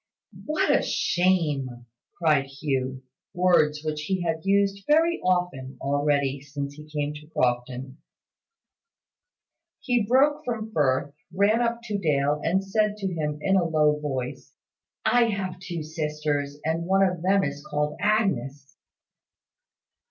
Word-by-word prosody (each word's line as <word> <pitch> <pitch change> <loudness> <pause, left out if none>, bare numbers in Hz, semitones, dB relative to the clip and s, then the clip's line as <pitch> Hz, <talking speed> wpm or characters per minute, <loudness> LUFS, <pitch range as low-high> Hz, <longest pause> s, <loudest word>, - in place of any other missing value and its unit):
"What 310 +6 +2
a - - +3
shame!" 150 -9 0 0.3
cried 150 -5 +2
Hugh; 135 -2 -3 0.3
words 165 -4 +3
which 155 -1 -2
he 180 +4 -1
had 165 -1 -2
used 200 0 +1
very 325 +3 +3
often 175 -8 -1
already 140 -1 0
since 140 0 -5
he 150 +1 -13
came 150 -1 -2
to 150 0 -11
Crofton. 125 0 -2 1.8
He 245 -4 +1
broke 275 +5 +3
from 225 -2 -4
Firth, 140 -4 +1 0.2
ran 200 +5 +3
up 235 0 0
to 210 -3 -3
Dale, 150 -3 +1
and 190 +4 +1
said 210 +1 +1
to 195 -3 -3
him, 150 -2 -2
in 195 - +3
a 185 - +4
low 150 -2 +2
voice, 130 -4 -5 0.5
"I 245 -1 +4
have 190 -5 -3
two 175 -4 -5
sisters, 150 -2 -2
and 165 +2 -1
one 195 +1 +4
of 180 -3 0
them 195 +2 +3
is 140 0 -4
called 150 0 -2
Agnes." 145 - 0
155 Hz, 135 wpm, -25 LUFS, 145-195 Hz, 1.8 s, a